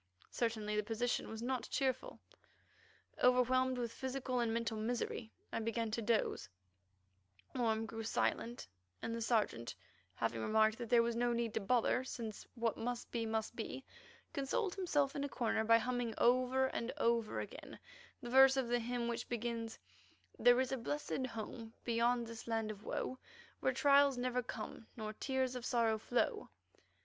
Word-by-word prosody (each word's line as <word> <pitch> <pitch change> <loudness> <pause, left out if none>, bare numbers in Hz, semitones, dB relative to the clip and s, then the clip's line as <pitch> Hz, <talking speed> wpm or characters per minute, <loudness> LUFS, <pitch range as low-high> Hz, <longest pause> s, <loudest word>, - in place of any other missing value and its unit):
Certainly 220 -3 -1
the 210 - +3
position 230 +3 -1
was 220 +1 -6
not 255 0 -2
cheerful. 260 -2 -1 1.0
Overwhelmed 255 +1 +4
with 240 -2 -2
physical 260 -1 -2
and 235 -2 +1
mental 230 0 -1
misery, 230 0 -2 0.2
I - - 0
began 230 0 -1
to 230 - -1
doze; 225 0 0 1.0
Orme 225 -3 +1
grew 225 0 -5
silent, 230 +2 -1 0.4
and 230 - -2
the 230 - -3
Sergeant, 215 - 0 0.4
having 115 0 -1
remarked 220 - +3
that 235 -2 -5
there 235 -1 +6
was 235 0 0
no 240 0 +2
need 235 -2 -1
to - - +1
bother, 245 +4 +2
since 230 -4 -6
what 230 -2 0
must 240 +1 -3
be 230 -2 -1
must 220 +1 -2
be, 240 +3 -5 0.5
consoled 285 +8 0
himself 295 -7 +1
in 280 - -1
a 285 - -2
corner 225 -4 0
by 230 +1 +6
humming 240 -1 -1
over 255 +2 +4
and 245 -2 -2
over 230 -4 +1
again - - -7 0.5
the 240 - -5
verse 265 +1 +8
of 255 -3 0
the 245 0 +2
hymn 240 0 -2
which 235 -1 -3
begins: 230 -1 -3 0.6
"There 245 0 +6
is 260 0 +1
a 265 - 0
blessed 260 +1 -2
home 225 0 -7
beyond 235 +1 +2
this 230 0 -8
land 225 -2 0
of 210 0 -10
woe, 260 - -3 0.4
Where - - +2
trials 280 -2 +5
never 250 0 0
come 230 -1 -7
nor 215 -1 -4
tears 260 +2 -1
of 250 - -4
sorrow 230 -3 +2
flow." 250 - 0
235 Hz, 165 wpm, -36 LUFS, 225-255 Hz, 1.0 s, verse